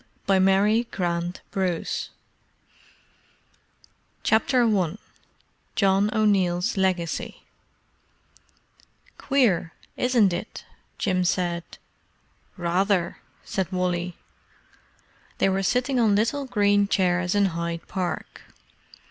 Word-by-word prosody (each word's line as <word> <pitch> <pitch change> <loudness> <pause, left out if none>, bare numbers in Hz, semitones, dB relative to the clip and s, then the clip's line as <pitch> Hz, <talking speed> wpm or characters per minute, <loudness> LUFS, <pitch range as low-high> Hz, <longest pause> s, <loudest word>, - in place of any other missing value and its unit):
All 195 -1 +4
Clear 200 +4 +3
CAPTAIN 175 -4 -2 0.4
JIM - - -8 2.4
CHAPTER 245 +3 +3
I 195 -5 +1 0.8
JOHN 195 0 +3
O'NEILL'S 190 -5 +1
LEGACY 185 -4 -1 1.8
"Queer, 225 -12 +1 0.2
isn't 235 -7 +3
it?" - - -6 0.3
Jim 185 -2 0
said. 175 -1 0 0.9
"Rather!" 180 +1 0 0.3
said 190 -1 -2
Wally. 180 -1 -2 1.2
They - - +2
were 190 0 0
sitting 250 +6 +1
on 215 -4 +4
little 235 +7 0
green 205 -4 +2
chairs 180 -1 +1
in 205 -1 +4
Hyde 170 0 -4
Park. 185 -2 -4
190 Hz, 85 wpm, -25 LUFS, 175-210 Hz, 2.4 s, All